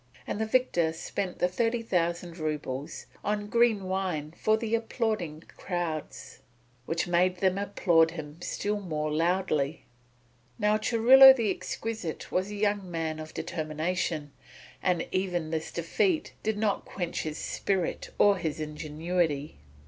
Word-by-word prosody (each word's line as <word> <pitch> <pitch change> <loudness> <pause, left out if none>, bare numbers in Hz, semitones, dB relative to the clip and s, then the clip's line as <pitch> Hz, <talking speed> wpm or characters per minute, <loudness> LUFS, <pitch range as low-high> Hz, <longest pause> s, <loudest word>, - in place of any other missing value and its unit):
And 210 - -3
the 220 - 0
victor 195 -10 +2
spent 180 +3 -4
the 180 - +2
thirty 230 +5 0
thousand 175 -3 -1
roubles 150 -3 -4 0.2
on 205 0 -1
green 230 -2 +3
wine 185 -6 -2
for 215 0 +2
the 225 0 -3
applauding 220 -8 -1 0.2
crowds, 175 -4 -4 0.5
which 165 +1 -1
made 180 +1 +2
them 190 +1 +1
applaud 175 -5 +3
him 160 0 -8
still 205 +3 -2
more 155 -5 -2
loudly. 165 -2 0 0.7
Now 210 +1 +3
Churilo 255 +4 +8
the 225 -6 +1
Exquisite 220 -4 -5
was 185 +2 0
a 210 - -5
young 205 -2 0
man 160 -2 -3
of 155 0 -9
determination, 155 -1 -2 0.5
and 180 -3 +1
even 180 -4 -1
this 160 -1 -3
defeat 310 - 0
did 220 -1 -1
not 210 -2 0
quench 175 -3 -4
his 155 -1 -4
spirit 190 -3 -2
or 205 -1 +5
his 160 -3 -3
ingenuity. 155 - -2
180 Hz, 135 wpm, -28 LUFS, 160-210 Hz, 0.7 s, Churilo